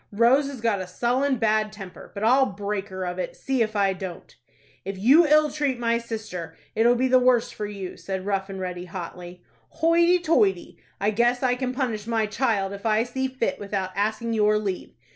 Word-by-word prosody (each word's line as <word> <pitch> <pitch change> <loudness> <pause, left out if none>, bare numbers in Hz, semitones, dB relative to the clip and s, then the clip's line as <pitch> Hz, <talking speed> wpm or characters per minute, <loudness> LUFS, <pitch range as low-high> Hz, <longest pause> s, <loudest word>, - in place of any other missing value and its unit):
Rose 240 +7 +4
has 275 -4 -7
got 220 -4 +1
a 185 - -6
sullen, 255 +8 0
bad 215 -1 +1
temper; 195 -4 -10
but 200 - -4
I'll 260 +4 +4
break 200 0 -4
her 185 -1 -5
of 180 +1 -4
it, - - -4
see 265 -2 -1
if 220 -1 0
I 200 -2 +2
don't." 185 -2 -8 0.5
"If 195 +1 -5
you 280 - +6
ill 300 0 +4
treat 285 -4 -1
my 235 -1 +1
sister, 215 -8 -6 0.2
it'll 235 +2 +4
be 255 +2 +1
the 255 0 +5
worse 250 -2 +3
for 210 - -5
you," 195 -3 -7
said 190 -1 -5
Rough 195 -1 -1
and 190 -1 -6
Ready, 180 -1 -5
hotly. 180 0 -8 0.4
"Hoity 340 +2 +5
toity, 215 - +1 0.2
I 205 +2 +1
guess 240 +4 +1
I 250 -1 +3
can 250 0 -2
punish 240 -5 -3
my 225 -2 +1
child, 215 -3 0
if 200 0 -9
I 220 0 +2
see 260 +2 -2
fit, 260 -2 -2
without 200 -2 -3
asking 215 +3 -1
your 210 -1 +3
leave." 200 -3 -4
215 Hz, 200 wpm, -25 LUFS, 195-250 Hz, 0.5 s, you